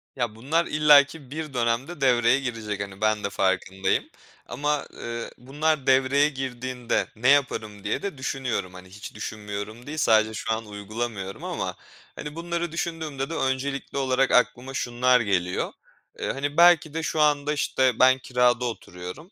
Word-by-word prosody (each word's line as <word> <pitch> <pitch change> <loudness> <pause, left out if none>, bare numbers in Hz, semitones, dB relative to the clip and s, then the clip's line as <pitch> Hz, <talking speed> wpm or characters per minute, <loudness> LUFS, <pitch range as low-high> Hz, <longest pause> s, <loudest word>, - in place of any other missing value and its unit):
Ya, 120 -4 -2
bunlar 150 +9 0
illaki 150 -2 +4
bir 155 -1 -5
dönemde 125 +6 -1
devreye 125 -1 +4
girecek, 115 -6 -4
hani, 100 0 -7
ben 110 -1 +1
de 100 - -1
farkındayım 95 0 0 0.4
ama, 145 +2 -2
eee, 115 0 -5
"Bunlar 145 +3 -1
devreye 135 +2 +4
girdiğinde 130 -3 -2
ne 120 +4 +2
yaparım?" 110 -7 +1
diye - - -1
de 195 -7 -4
düşünüyorum. 130 -8 -3
Hani, 90 0 -12
hiç 105 +3 -10
düşünmüyorum 105 +2 -6
değil, 155 +2 -5
sadece 110 -5 +3
şu 110 - -3
an 110 0 -4
uygulamıyorum 105 -1 -5
ama - - -3 0.4
hani, 150 0 -7
bunları 170 0 -3
düşündüğümde 160 -5 -3
de - - -4
öncelikli 135 -1 -2
olarak 135 0 +2
aklıma 125 +1 +2
şunlar 125 0 +2
geliyor: 95 -5 -1 0.5
Eee, - - -1
hani, 145 +2 -3
belki 170 -3 +6
de 165 0 -3
şu 155 - -2
anda, 150 0 +2
işte, 130 -4 +1
ben 130 +1 +6
kirada 125 -1 +2
oturuyorum, 95 - -7
130 Hz, 150 wpm, -25 LUFS, 110-145 Hz, 0.5 s, belki